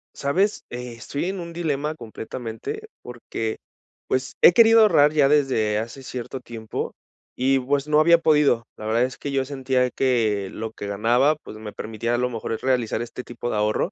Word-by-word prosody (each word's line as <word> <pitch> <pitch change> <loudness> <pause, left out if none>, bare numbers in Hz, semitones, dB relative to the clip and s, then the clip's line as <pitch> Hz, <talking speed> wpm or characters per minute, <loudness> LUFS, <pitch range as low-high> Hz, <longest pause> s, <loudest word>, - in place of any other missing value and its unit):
¿Sabes?, 185 +9 0
estoy 125 +4 -5
en 190 +1 -3
un 170 -1 -7
dilema 155 -3 -2
completamente 120 - -7 0.2
porque, 115 -2 -5 0.5
pues, 130 0 -1
he 175 - +8
querido 225 +2 +7
ahorrar 155 -8 +5
ya 145 -3 +4
desde 130 -8 +2
hace 115 +5 -5
cierto 130 +1 -6
tiempo 115 -3 -6 0.4
y, 135 +1 +3
pues, 140 +2 -1
no 150 0 +4
había 170 +2 +6
podido. 150 -7 +3
La 110 - -9
verdad 115 +2 +2
es 130 0 -3
que 145 - -5
yo 135 -1 0
sentía 130 -2 0
que 110 -7 +1
lo 110 0 -5
que 105 - -7
ganaba, 120 +9 +2
pues, 110 - -10
me 110 -1 -8
permitía 115 +2 -3
a - - 0
lo 125 +1 0
mejor 115 -2 -4
es 110 - -4
realizar 125 -4 0
este 120 +1 -8
tipo 120 0 -6
de - - -1
ahorro, 105 - 0
130 Hz, 185 wpm, -23 LUFS, 115-150 Hz, 0.5 s, he